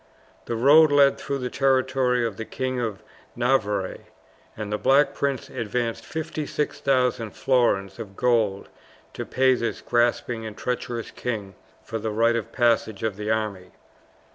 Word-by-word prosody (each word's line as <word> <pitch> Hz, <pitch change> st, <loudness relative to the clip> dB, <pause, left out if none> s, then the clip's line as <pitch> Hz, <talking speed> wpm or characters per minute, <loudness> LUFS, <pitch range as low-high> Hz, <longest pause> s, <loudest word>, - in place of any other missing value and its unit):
The 120 Hz, -, -3 dB
road 145 Hz, +6 st, +6 dB
led 140 Hz, -1 st, +5 dB
through 140 Hz, -, -3 dB
the 125 Hz, -2 st, -4 dB
territory 130 Hz, -2 st, +2 dB
of 110 Hz, -4 st, -4 dB
the 115 Hz, -, -4 dB
King 130 Hz, +2 st, -3 dB
of 110 Hz, -5 st, -3 dB, 0.3 s
Navarre, 110 Hz, -6 st, 0 dB, 0.6 s
and 105 Hz, -1 st, -4 dB
the 105 Hz, -, -1 dB
Black 135 Hz, +5 st, +4 dB
Prince 140 Hz, -3 st, -2 dB
advanced 115 Hz, +1 st, -3 dB
56,000 140 Hz, -6 st, -1 dB
florins 100 Hz, -7 st, +1 dB
of 100 Hz, -3 st, -8 dB
gold 110 Hz, -5 st, +1 dB, 0.4 s
to -, -, -6 dB
pay 130 Hz, 0 st, +3 dB
this 120 Hz, -2 st, -2 dB
grasping 120 Hz, -1 st, 0 dB
and 110 Hz, -1 st, -7 dB
treacherous 125 Hz, -2 st, -3 dB
king 105 Hz, -5 st, -4 dB, 0.3 s
for 115 Hz, 0 st, -4 dB
the 110 Hz, +1 st, -3 dB
right 115 Hz, +2 st, +2 dB
of 115 Hz, -3 st, -3 dB
passage 115 Hz, -4 st, +1 dB
of 110 Hz, -3 st, -1 dB
the 105 Hz, +1 st, -5 dB
army. 105 Hz, -4 st, -2 dB
120 Hz, 145 wpm, -24 LUFS, 110-130 Hz, 0.6 s, road